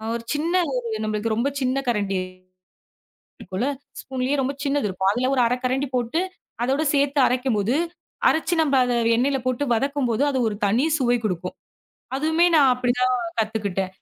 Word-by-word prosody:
ஒரு 235 - -5
சின்ன 320 +4 -1 0.2
ஒரு 245 -2 -2 0.2
நம்மளுக்கு 215 +1 -1
ரொம்ப 240 +5 +1
சின்ன 260 +1 0
கரண்டி 205 -4 0 1.2
இருக்கும்ல! 195 +8 -3 0.3
ஸ்பூன்லயே 260 +1 -2
ரொம்ப 270 +2 -1
சின்னது 280 -6 0
இருக்கும், 190 0 0
அதில 250 +4 0
ஒரு 255 - +3
1/2கரண்டி 255 +3 -1
போட்டு, 245 +6 0 0.4
அதோட 270 +5 +1
சேத்து 280 0 +2
அரைக்கும் 250 -2 0
போது, 225 +6 +1 0.5
அரைச்சு 320 +2 +1
நம்ப 285 -3 +2
அத 245 - 0 0.2
எண்ணெயில 270 +3 +1
போட்டு 255 +2 0
வதக்கும் 275 +1 0
போது 230 +5 +1
அது 265 -2 0
ஒரு 205 - -5
தனி 230 +8 +2
சுவை 245 -2 +2
குடுக்கும். 180 -2 -3 0.6
அதுவுமே 320 +4 +2
நான் 275 -4 +6
அப்படி 245 -1 0
தான் 255 0 +3 0.2
கத்துக்கிட்டேன். 200 -4 -2
250 Hz, 160 wpm, -23 LUFS, 220-275 Hz, 1.2 s, நான்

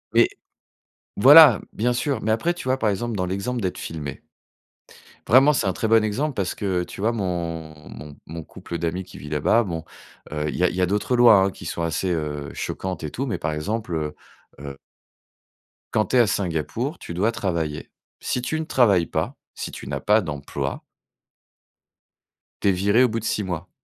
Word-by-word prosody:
et - - +6 0.9
voilà, 140 +1 +9
bien 120 +3 0
sûr, 135 +3 -1
mais 110 - 0
après, 140 +11 +1
tu 175 - -9
vois? 130 +1 +2
Par 110 - +2
exemple, 115 +3 -2
dans 90 -2 -1
l'exemple 100 +7 -3
d'être 95 -3 -2
filmé 75 -4 -6 1.0
vraiment, 135 +5 +6
c'est 125 - 0
un 95 - +1
très 110 - -2
bon 110 0 +5
exemple 135 +8 -1
parce 100 -6 -2
que, 95 -3 -1
tu 95 - -9
vois? 110 +3 +2
Mon 85 -7 -3 0.2
mon 75 +1 -10
mon 80 +1 -7
couple 85 - -8
d'amis 85 +3 -2
qui 90 - -13
vit 75 +3 -9
là-bas, 75 +10 +2
bon, 85 -5 -4 0.5
heu, 75 0 -2
il - - -5
y 90 - 0
a 90 - +5
il - - -6
y 95 - 0
a - - +4
d'autres 105 +6 0
lois 105 -5 +6
qui 85 - -12
sont 85 - -4
assez, 85 +3 -1
heu, 75 -4 -3
choquantes 95 -4 -4
et 75 - -4
tout 135 - -3
mais 125 - -2
par 75 - -2
exemple, 100 +5 -3
heu 75 -2 -2 0.5
heu 70 -1 -7 1.2
quand 110 - +2
tu 130 - +1
es - - +6
à 120 - +5
Singapour, 100 - -2
tu 85 - -7
dois 105 +6 +2
travailler. 85 -8 -3 0.3
Si 125 - -2
tu 160 +5 -2
ne 160 - -3
travailles 100 - +3
pas, - - -2 0.2
si - - -5
tu - - -9
n'as - - -3
pas 105 +1 +3
d'emploi 70 -6 -4 1.8
tu - - +1
es - - +5
viré, 100 +6 +3
au 125 - +3
bout 115 +1 -2
de 115 - -8
6 105 - 0
mois. 90 -4 -5
95 Hz, 200 wpm, -23 LUFS, 85-115 Hz, 1.8 s, voilà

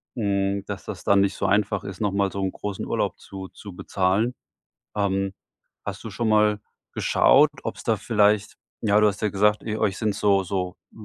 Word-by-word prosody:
hm, 100 -2 0
dass - - -6
das - - -7
dann 100 0 +5
nicht 100 0 +1
so - - -2
einfach 100 0 +1
ist, 95 +1 -7
noch 105 -2 +1
mal 100 0 +1
so 100 - -4
'n 95 - 0
großen 100 -2 -5
Urlaub - - -1
zu 95 -1 -8
zu 100 0 -11
bezahlen. 95 +7 0 0.6
Ähm, 95 -1 0 0.5
hast - - -5
du - - -7
schon 115 - -1
mal 105 -1 +3 0.3
geschaut, 150 +2 +5
ob's - - -5
da 115 -2 +2
vielleicht 105 -1 +2 0.2
ja, 105 -1 +3
du 105 - +5
hast 100 0 -3
ja 105 - +2
gesagt, 105 +1 +2
ihr 110 -1 -3
euch 105 -3 0
sind 105 -3 0
so 100 -1 +2
so 90 0 -3 0.2
g - - -17
100 Hz, 200 wpm, -24 LUFS, 95-105 Hz, 0.6 s, dann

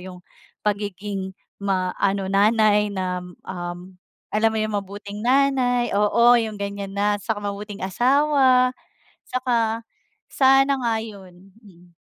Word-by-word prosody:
yung 180 -1 -10 0.4
pagiging 200 -1 -3 0.3
maano 195 0 -1
nanay 210 0 +3
nam 180 -1 -4 0.2
um, 175 0 -7 0.3
alam 220 +1 +2
mo 220 - -2
yung 215 -1 -1
mabuting 205 +1 -7
nanay 255 -2 +2
oo, 235 +4 +5
yung 220 -3 -2
ganiyan 200 -1 -5
na. 205 +1 +1
Saka 215 0 -2
mabuting 205 0 -6
asawa, 255 - +3 0.6
saka 230 -3 -1 0.5
sana 270 +1 +4
nga 235 -3 0
yun, 195 -3 -13
mm. 180 -5 -20
205 Hz, 115 wpm, -22 LUFS, 195-235 Hz, 0.6 s, oo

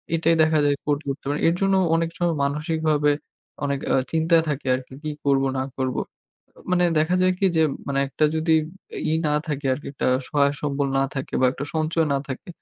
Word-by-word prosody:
এটাই 165 0 +3
দেখা 155 -1 +3
যায় 145 - +3
কোর্ট 145 -1 +1
করতে 135 0 -4
পারি 145 - -1
এর 165 - +3
জন্য 195 0 +3 0.2
অনেক 165 0 +1
সময় 175 -2 +1
মানসিকভাবে 150 0 +1 0.5
অনেক 140 -1 0
আ - - +4 0.2
চিন্তায় 165 0 +3
থাকে 140 -1 -3
আরকি 130 0 -8
কি 155 - -2
করব 135 -1 +3
না 130 - 0
করব? 130 -1 -1 0.8
মানে 180 -1 +3
দেখা 160 +4 +2
যায় 185 0 +4
কি 195 - +3
যে 160 - +5 0.2
মানে 140 -1 -1
একটা 155 +3 0
যদি 160 +1 +2 0.6
ই - - +3
না 150 - +1
থাকে 145 -2 -3
আরকি 135 +2 -5
একটা 140 - -1 0.2
সহায় 140 -1 +2
সম্বল 140 -1 0
না 135 - +3
থাকে 135 -1 -5
বা 130 - +5
একটা 140 - -5
সঞ্চয় 160 0 +1
না 140 - +2
থাকে 130 +5 -6
150 Hz, 200 wpm, -23 LUFS, 140-160 Hz, 0.8 s, যে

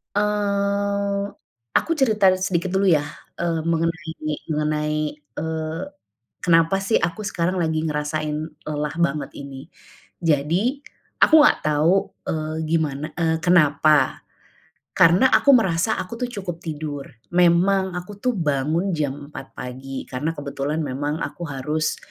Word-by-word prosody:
Eee, 200 -1 0 0.6
aku - - +2
cerita 215 -7 +4
sedikit 185 -1 -1
dulu 195 +1 +2
ya. 155 -5 +4 0.3
E - - -4 0.2
mengenai, 165 -1 -1 0.4
mengenai, 150 0 0
eee, 160 +2 -5 0.6
kenapa 165 +1 +4
sih 220 - +2
aku 170 +5 -2
sekarang 180 -2 -1
lagi 160 -3 0
ngerasain 150 0 -2 0.3
lelah 150 -1 -2
banget 150 -3 0
ini. 140 -1 -9 0.6
Jadi, 170 - +1 0.4
aku 315 0 +8
enggak - - +5
tahu, 155 +2 +3 0.4
eee, 155 0 -2
gimana, 155 -3 0
e 160 -1 +1
kenapa? 155 -3 +4 0.7
Karena 185 +8 +5
aku 280 -2 +6
merasa 190 -2 +1
aku 230 +6 -6
tuh 250 - -1
cukup 190 -8 -6
tidur. 150 -3 -5 0.3
Memang 180 +2 +3
aku 195 +3 -7
tuh 250 -1 0
bangun 160 +3 0
jam 150 -5 -1 0.2
4 135 - -10
pagi, 130 +1 -6
karena 150 +6 -3
kebetulan 145 +2 -3
memang 145 +2 -2
aku 170 -1 -6
harus, 150 +3 -1
165 Hz, 125 wpm, -22 LUFS, 150-190 Hz, 0.7 s, aku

